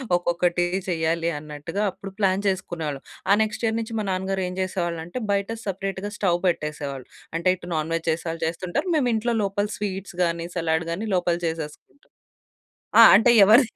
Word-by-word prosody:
ఒక్కొక్కటి 175 0 +1 0.2
చెయ్యాలి 165 0 0
అన్నట్టుగా 150 +6 -4
అప్పుడు 195 +2 -9
ప్లాన్ 195 -1 +2
చేసుకునేవాళ్ళం. 165 -7 -2 0.3
ఆ - - +8
నెక్స్ట్ 215 +2 -5
ఇయర్ 225 0 +1
నుంచి 225 0 -5
మా 210 - -2
నాన్నగారు 190 +1 -1
ఏం 180 - -5
చేసేవాళ్ళంటే 175 +1 -3
బయట 200 +1 0 0.2
సెపరేట్‌గా 195 +1 -3
స్టవ్ 175 -3 +1
పెట్టేసేవాళ్ళు. 150 -5 -3 0.3
అంటే 170 - -2
ఇటు 175 0 -10
నాన్‌వెజ్ 165 +1 -1
చేసే 160 +2 -1
వాళ్ళు 165 0 -4
చేస్తుంటారు 175 - -2
మేము 255 -5 +2
ఇంట్లో 235 +2 0
లోపల 205 +1 0
స్వీట్స్ 195 -3 -5
గానీ 170 0 -1
సలాడ్ 160 -1 0
గానీ 200 +7 -3
లోపల 175 -1 +1
చేసేసుకుంటాం 160 - -7 0.9
ఆ! - - +12
అంటే 225 +4 +5
ఎవరిది 220 +4 +6
180 Hz, 155 wpm, -24 LUFS, 165-200 Hz, 0.9 s, ఆ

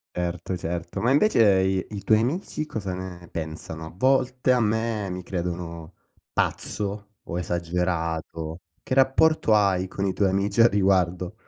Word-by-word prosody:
Certo, 90 +1 -3
certo. 85 0 -4
Ma 120 +3 +2
invece, 145 - +4 0.2
i 95 -1 0
i 100 - -6
tuoi 110 -1 +4
amici 155 - -2
cosa 100 -10 -4
ne 90 -1 -7
pensano? 80 0 -6
A 80 - -10
volte 130 +2 +2
a 125 - +4
me, 110 -2 0
mi 90 0 -4
credono 85 -2 -5 0.4
pazzo 105 0 -2
o 85 - -5
esagerato. 85 -1 -2 0.2
Che - - -4
rapporto 135 -1 +4
hai 95 -3 +3
con 100 +1 -3
i 95 - 0
tuoi 100 0 +2
amici 100 +3 +1
a 115 - +8
riguardo? 95 -2 +1
95 Hz, 150 wpm, -25 LUFS, 85-110 Hz, 0.4 s, a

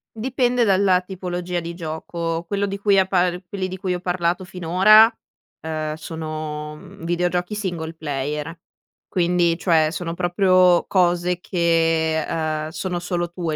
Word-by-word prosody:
Dipende 245 +1 +1
dalla 190 -3 +3
tipologia 180 -1 -4
di 170 0 -6
gioco. 165 0 -4
Quello 200 +1 -1
di 200 0 -4
cui 200 -1 +3
ha 190 - +5
par 180 -1 0
quelli 190 -1 -3
di 185 - -6
cui 185 -1 -2
ho 180 - -3
parlato 175 0 -1
finora, 185 +5 +5 0.6
uhm, 155 -1 -3
sono, 155 -1 -6
mhmm, 170 +2 -12
videogiochi 175 +2 -1
single 175 -6 -4
player. 150 +1 -4 0.5
Quindi, 175 -1 +2
cioè, 160 -4 +3
sono 170 -1 -4
proprio 180 0 +3
cose 175 -1 +1
che, 165 -3 +1
uhm, 155 -1 -2
sono 175 +2 -3
solo 175 -1 -2
tue. 170 -3 -3
175 Hz, 140 wpm, -22 LUFS, 165-185 Hz, 0.6 s, ha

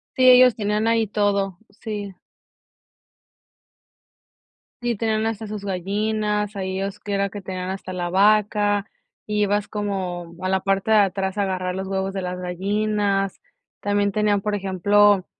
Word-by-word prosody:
Sí, 255 -1 +6
ellos 250 -1 +7
tenían 210 +1 0
ahí 225 -1 +2
todo. 200 -3 0 0.2
Sí. 205 -4 -5 2.7
Sí, 240 -1 0
tenían 220 0 0
hasta 225 -1 -3
sus 210 -1 -6
gallinas, 210 +2 -1
ahí 190 -1 -3
ellos 195 0 -4
que 205 - -5
era 200 0 +1
que 205 0 -8
tenían 185 -1 -5
hasta 190 -1 -5
la 175 -1 -3
vaca, 205 +1 +3 0.4
ibas 205 -1 0
como 185 -5 -4
a 185 - 0
la 190 0 +2
parte 195 +3 0
de 215 - +6
atrás 195 0 +1
a 200 - +2
agarrar 185 -1 -2
los 190 0 -4
huevos 190 0 -2
de 190 - -3
las 180 0 -4
gallinas. 195 +2 -1 0.4
También 205 0 +1
tenían, 205 -1 +1
por 210 +1 -2
ejemplo, 200 0 +3
200 Hz, 150 wpm, -23 LUFS, 190-210 Hz, 2.7 s, ellos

